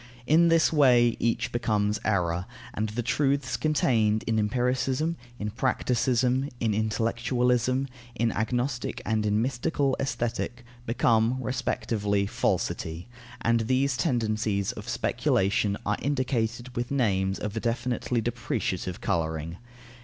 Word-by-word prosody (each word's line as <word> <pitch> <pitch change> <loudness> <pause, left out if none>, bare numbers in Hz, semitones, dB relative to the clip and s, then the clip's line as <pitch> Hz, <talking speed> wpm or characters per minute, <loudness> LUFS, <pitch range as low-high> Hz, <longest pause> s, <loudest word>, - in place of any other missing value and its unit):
In 165 +5 +5
this 165 -1 +4
way, 125 -5 +5
each 115 0 0
becomes 105 -3 0
error, 90 -3 0 0.3
and 110 0 -2
the 120 +3 -3
truths 140 +2 +1
contained 115 -8 +2
in 110 -1 +1
empiricism, 130 +8 0 0.2
in 105 -1 -3
practicism, 125 +2 +1
in 110 -2 +1
intellectualism, 120 +4 +1 0.3
in 115 -1 +1
agnostic 120 +3 -2
and 110 -1 0
in 105 +2 +2
mystical 135 +2 0
Aesthetic, 120 -1 -2 0.2
become, 115 +1 +2
respectively, 110 -5 -1
falsity, 100 -5 -2 0.3
and 115 0 +2
these 130 +1 +2
tendencies 110 - 0
of - - -8
speculation 100 +1 +1
are 105 - 0
indicated 125 -3 -1
with 120 0 -2
names 95 -8 +1
of 105 +1 -4
a - - 0
definitely 120 0 -1
depreciative 110 -6 -3
colouring. 80 0 -2
115 Hz, 115 wpm, -27 LUFS, 105-130 Hz, 0.3 s, In